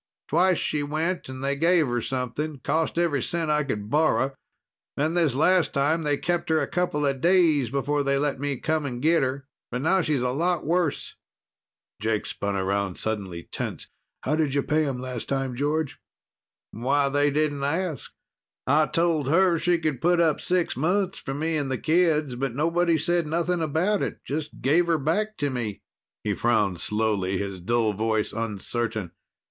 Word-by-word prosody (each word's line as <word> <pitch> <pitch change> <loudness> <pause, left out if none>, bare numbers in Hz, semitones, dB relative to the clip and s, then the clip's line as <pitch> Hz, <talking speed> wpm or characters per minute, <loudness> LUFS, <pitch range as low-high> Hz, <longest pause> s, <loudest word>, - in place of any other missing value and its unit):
Twice 180 +3 +3
she 150 - -1
went 155 +3 -2
and 130 0 -7
they 140 +1 +1
gave 165 +2 +3
her 120 -2 -1
something. 135 +4 -3
Cost 160 +1 0
every 165 -6 +1
cent 165 +1 -1
I 150 0 +2
could 105 -7 -4
borrow. 150 -3 +2 0.6
Then 155 +3 +1
this 165 -7 +2
last 180 +4 +3
time, 150 +4 +2
they 145 -2 +1
kept 175 +2 -1
her 160 -1 +3
a - - 0
couple 175 -5 -1
days 155 -3 +3
before 140 +3 0
they 140 0 +1
let 140 -1 0
me 140 -1 -2
come 155 +2 -1
and 120 -2 -5
get 160 +5 +3
her. 135 +1 -2 0.2
But 125 +2 -3
now 190 +4 +3
she's 150 -6 0
a 125 - +1
lot 170 +5 0
worse." 170 -1 0 0.9
Jake 110 -1 0
spun 100 0 -3
about, 95 0 -1
suddenly 95 -6 -3
tense. - - -5 0.3
"How'd 150 -1 0
you 140 - +2
pay 155 +1 +1
them 135 -3 -2
last 125 -2 -5
time, 135 -2 -1
George?" 145 +1 -1 0.7
"Why, 140 +5 +1
they 145 +1 +2
didn't 145 -1 0
ask. 160 0 -2 0.5
I 150 +3 +3
told 165 -4 +1
her 170 +1 +4
she 175 +1 +2
could 155 -6 -2
put 175 +1 +3
up 160 -3 +2
six 180 -1 0
months 185 +7 0
from 135 0 -5
me 160 +1 0
and 140 -3 -2
the 130 - -1
kids, 155 -4 +2
but 125 -1 -3
nobody 165 +3 +2
said 170 +1 0
nothing 170 +2 0
about 165 +7 +1
it. - - -2
Just 150 +2 -5
gave 165 +6 +3
her 165 -1 +3
back 205 +9 -1
to 145 -2 -1
me." 115 -6 -3 0.4
He 105 - 0
frowned 105 -7 +1
slowly, 105 -3 0
his 100 -1 -4
dull 110 +3 +1
voice 110 +1 -1
uncertain. 110 -2 -3
145 Hz, 175 wpm, -25 LUFS, 125-165 Hz, 0.9 s, her